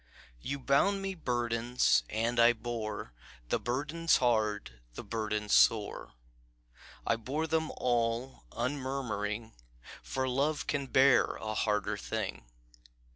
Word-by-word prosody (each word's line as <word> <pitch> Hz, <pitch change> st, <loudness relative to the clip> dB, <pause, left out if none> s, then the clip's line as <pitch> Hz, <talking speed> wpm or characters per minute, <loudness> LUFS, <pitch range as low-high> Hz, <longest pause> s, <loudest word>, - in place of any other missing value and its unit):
"You 140 Hz, -, -3 dB
bound 165 Hz, +9 st, +2 dB
me 195 Hz, 0 st, -2 dB
burdens, 120 Hz, -5 st, +1 dB
and 115 Hz, +2 st, 0 dB
I 120 Hz, +1 st, +7 dB
bore 110 Hz, -, -5 dB, 0.4 s
The -, -, +1 dB
burdens 155 Hz, +7 st, +1 dB
hard, 105 Hz, -, 0 dB
the -, -, -6 dB
burdens 105 Hz, -2 st, -2 dB
sore; 110 Hz, -3 st, +3 dB, 0.9 s
I 115 Hz, -, +2 dB
bore 140 Hz, +8 st, -2 dB
them 160 Hz, 0 st, 0 dB
all 120 Hz, +1 st, -1 dB
unmurmuring, 120 Hz, -5 st, -3 dB, 0.5 s
For 130 Hz, 0 st, -2 dB
Love 140 Hz, +4 st, 0 dB
can 140 Hz, -2 st, -2 dB
bear 130 Hz, 0 st, +4 dB
a 110 Hz, 0 st, -4 dB
harder 105 Hz, -1 st, 0 dB
thing. -, -, -4 dB
120 Hz, 115 wpm, -31 LUFS, 110-140 Hz, 0.9 s, I